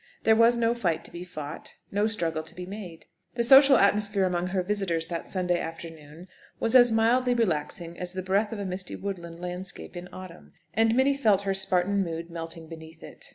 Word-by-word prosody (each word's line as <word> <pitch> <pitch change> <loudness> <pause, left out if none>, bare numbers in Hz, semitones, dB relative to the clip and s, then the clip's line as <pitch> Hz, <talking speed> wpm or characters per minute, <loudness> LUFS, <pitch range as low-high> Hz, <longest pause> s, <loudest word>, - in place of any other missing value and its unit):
There 220 - +5
was 230 +1 +5
no 230 0 +2
fight 170 -9 -1
to - - -11
be 175 - -7
fought, 155 -5 -8 0.2
no 205 +2 +1
struggle 165 -8 -2
to 160 +2 -13
be 180 0 -7
made. 185 -4 -9 0.3
The 235 - +1
social 270 +2 +8
atmosphere 205 -1 +2
among 180 -1 -1
her 185 0 -1
visitors 180 -4 -1
that 170 -1 -5
Saturday 180 -2 0
afternoon 165 0 -9 0.3
was 225 - 0
as 245 -2 +7
mildly 245 +3 +2
relaxing 170 -4 -2
as 180 0 -4
the 185 0 -4
breath 200 +3 +1
of 225 - -4
a 200 - -4
misty 185 0 -3
woodland 170 -4 -6
landscape 180 +1 -5
in 175 +1 -8
autumn, 185 -2 -11 0.2
and 225 +1 +3
Minnie 270 +2 +3
felt 210 -8 +2
her 195 -1 0
Spartan 190 +1 +1
mood 165 -1 -6
melting 165 -1 -6
beneath 160 0 -12
it. - - -12
185 Hz, 200 wpm, -27 LUFS, 170-215 Hz, 0.3 s, social